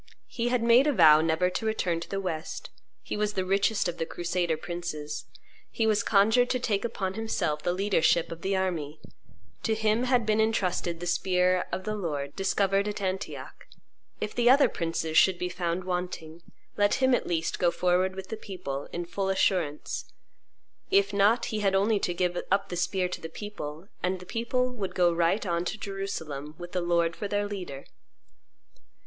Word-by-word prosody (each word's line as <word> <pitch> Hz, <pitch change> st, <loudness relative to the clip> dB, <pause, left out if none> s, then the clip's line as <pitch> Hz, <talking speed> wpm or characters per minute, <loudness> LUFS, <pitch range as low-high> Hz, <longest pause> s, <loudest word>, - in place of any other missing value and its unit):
He 235 Hz, -1 st, -2 dB
had 245 Hz, -1 st, +1 dB
made 240 Hz, +5 st, +6 dB
a 295 Hz, -, +3 dB
vow 155 Hz, -7 st, +7 dB
never 165 Hz, +3 st, +1 dB
to 220 Hz, -, -3 dB
return 180 Hz, -6 st, 0 dB
to 170 Hz, -, -8 dB
the 195 Hz, -, -2 dB
West; 170 Hz, -4 st, -5 dB, 0.3 s
he -, -, -4 dB
was 210 Hz, 0 st, 0 dB
the 190 Hz, -2 st, -1 dB
richest 200 Hz, +2 st, +2 dB
of 175 Hz, 0 st, -4 dB
the 165 Hz, -, 0 dB
crusader 175 Hz, -2 st, -1 dB
princes; 155 Hz, -3 st, -5 dB, 0.4 s
he 225 Hz, -, -1 dB
was 215 Hz, -2 st, +3 dB
conjured 220 Hz, +5 st, +4 dB
to 255 Hz, -, +1 dB
take 210 Hz, -5 st, 0 dB
upon 190 Hz, -5 st, -2 dB
himself 190 Hz, -8 st, -1 dB
the 175 Hz, -, 0 dB
leadership 180 Hz, -3 st, +2 dB
of 165 Hz, 0 st, -7 dB
the 195 Hz, +1 st, 0 dB
army; 165 Hz, -6 st, -2 dB, 0.6 s
to 220 Hz, -, 0 dB
him 220 Hz, +2 st, +1 dB
had 250 Hz, -3 st, +2 dB
been 215 Hz, 0 st, +2 dB
intrusted 180 Hz, -6 st, 0 dB
the -, -, -3 dB
spear 180 Hz, +1 st, +2 dB
of 185 Hz, -, -3 dB
the 215 Hz, -, -2 dB
Lord 145 Hz, -8 st, -3 dB
discovered 195 Hz, +1 st, +1 dB
at 210 Hz, -, -3 dB
Antioch; 190 Hz, -1 st, -5 dB, 0.5 s
if 210 Hz, -, -3 dB
the 240 Hz, 0 st, +3 dB
other 275 Hz, +2 st, +7 dB
princes 165 Hz, -1 st, +1 dB
should 190 Hz, -2 st, +4 dB
be 180 Hz, 0 st, -2 dB
found 175 Hz, 0 st, -2 dB
wanting, 180 Hz, -3 st, -4 dB, 0.4 s
let 205 Hz, 0 st, +3 dB
him 260 Hz, -1 st, +3 dB
at -, -, +1 dB
least 165 Hz, -1 st, -1 dB
go 175 Hz, -, +4 dB
forward 180 Hz, +2 st, +1 dB
with 190 Hz, 0 st, -7 dB
the 220 Hz, -, -4 dB
people, 170 Hz, -10 st, -6 dB
in 175 Hz, 0 st, -4 dB
full 195 Hz, +2 st, -2 dB
assurance; 180 Hz, -6 st, 0 dB, 0.8 s
if 200 Hz, +1 st, +3 dB
not, 210 Hz, +4 st, +3 dB
he 215 Hz, -, 0 dB
had 195 Hz, -2 st, +2 dB
only 205 Hz, +2 st, +3 dB
to 180 Hz, -, -1 dB
give 175 Hz, 0 st, 0 dB
up 195 Hz, +1 st, +1 dB
the 175 Hz, -, -4 dB
spear 180 Hz, +1 st, 0 dB
to 180 Hz, -, -6 dB
the 165 Hz, -, -6 dB
people, 165 Hz, -3 st, -7 dB
and 185 Hz, +1 st, -1 dB
the 180 Hz, -, -11 dB
people 250 Hz, +5 st, -1 dB
would 205 Hz, -6 st, -5 dB
go 175 Hz, -1 st, +4 dB
right 170 Hz, +5 st, +1 dB
on 170 Hz, -2 st, 0 dB
to 200 Hz, -, -3 dB
Jerusalem, 160 Hz, -8 st, -5 dB
with 175 Hz, 0 st, -8 dB
the 180 Hz, -, -1 dB
Lord 170 Hz, -1 st, +1 dB
for 205 Hz, -, -4 dB
their 205 Hz, 0 st, 0 dB
leader. 180 Hz, -9 st, -6 dB
185 Hz, 190 wpm, -28 LUFS, 170-210 Hz, 0.8 s, vow